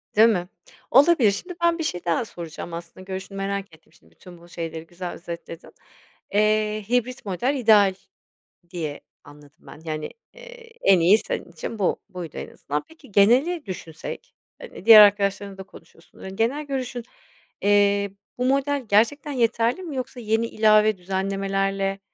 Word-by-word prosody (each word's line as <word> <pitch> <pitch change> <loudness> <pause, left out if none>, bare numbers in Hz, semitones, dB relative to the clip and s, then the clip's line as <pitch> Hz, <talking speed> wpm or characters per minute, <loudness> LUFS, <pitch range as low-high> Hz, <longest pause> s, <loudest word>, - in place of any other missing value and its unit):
Değil 220 +2 +7
mi? 180 -5 -1 0.4
Olabilir. 270 -4 +5
Şimdi 355 - -6
ben 340 0 +3
bir 325 - -3
şey 175 - -4
daha 170 +7 0
soracağım, 170 -3 -8
aslında, 170 +2 -9
görüşünü 190 +1 -7
merak 195 -2 -4
ettim. 160 - -28
Şimdi 80 - -25
bütün 175 - -15
bu 170 +1 -18
şeyleri 165 -1 -6
güzel 175 +1 -6
özetledin. 170 -1 -9 0.6
Eee, 215 0 +1
hibrit 250 0 -1
model 205 +9 -1
ideal 215 -6 +5 0.8
diye 160 -5 -5 0.2
anladım 145 0 -17
ben, 155 - -14
yani, 155 -1 -4 0.2
eee, - - -14
en 190 -2 +5
iyi 180 +6 +6
senin - - -5
için 225 - -7
bu 190 - +1
buydu 175 -4 -8
en - - -6
azından. 145 +1 -4
Peki 315 -7 -18
geneli 260 - +3
düşünsek, 165 -4 -8 0.3
hani, - - -11
diğer 225 -2 +11
arkadaşlarınla 200 -1 +2
da 190 - -7
konuşuyorsun, 165 -2 -19
ııı, - - -8
genel 235 +10 -1
görüşün 255 -3 -4 0.6
Eee, 200 0 +3 0.3
bu 250 - -1
model 275 0 0
gerçekten 270 +8 +2
yeterli 235 +4 0
mi 320 -6 -6
yoksa 255 0 -5
yeni 225 0 0
ilave 215 -1 +3
düzenlemelerle, 195 +1 -2
200 Hz, 155 wpm, -23 LUFS, 180-245 Hz, 0.8 s, diğer